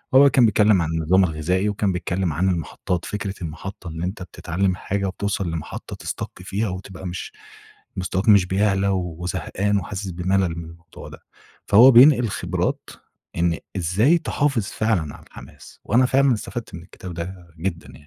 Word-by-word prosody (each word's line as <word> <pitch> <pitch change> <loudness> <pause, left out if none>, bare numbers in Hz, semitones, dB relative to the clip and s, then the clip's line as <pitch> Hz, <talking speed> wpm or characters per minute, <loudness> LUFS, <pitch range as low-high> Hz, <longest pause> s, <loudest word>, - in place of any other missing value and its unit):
هو 140 +1 +8
كان 125 -2 +5
بيتكلّم 105 -3 +4
عن 80 - -1
النظام 80 +4 +3
الغذائي 90 +5 0
وكان 100 -1 0
بيتكلّم 90 -1 -2
عن 95 +4 +1
المحطّات. 85 +1 -3
فكرة 105 -2 -4
المحطّة 85 +3 -7
اللي 80 +1 -4
أنت 95 +1 -5
بتتعلّم 90 +1 -2
حاجة 100 +2 -3
وبتوصل 95 -2 -2
لمحطة 80 -2 -6
تسstuck 90 - -6
فيها 100 +2 -2
وتبقى 95 0 -7
مش 90 0 -6 0.7
مستواك 95 +3 -2
مش 100 -3 +6
بيعلى 100 +1 +1
وزهقان 90 +3 -2
وحاسس 95 +1 -4
بملل 90 -1 0
من 85 - -6
الموضوع 85 0 -12
ده. - - -12 0.5
فهو 120 +6 +8
بينقل 125 -1 +7
خبرات، - - -2 0.5
إن 85 -1 +1 0.2
إزاي 105 - +3
تحافظ 140 -8 0
فعلًا 95 -11 -1
على - - -16
الحماس؟ - - -14
وأنا 125 +4 +3
فعلًا 135 0 +3
استفدت 115 0 -6
من 85 - -8
الكتاب 90 0 -10
ده 90 +1 -7
جدًا 85 -2 -3
يعني. - - -13
95 Hz, 160 wpm, -22 LUFS, 85-105 Hz, 0.7 s, هو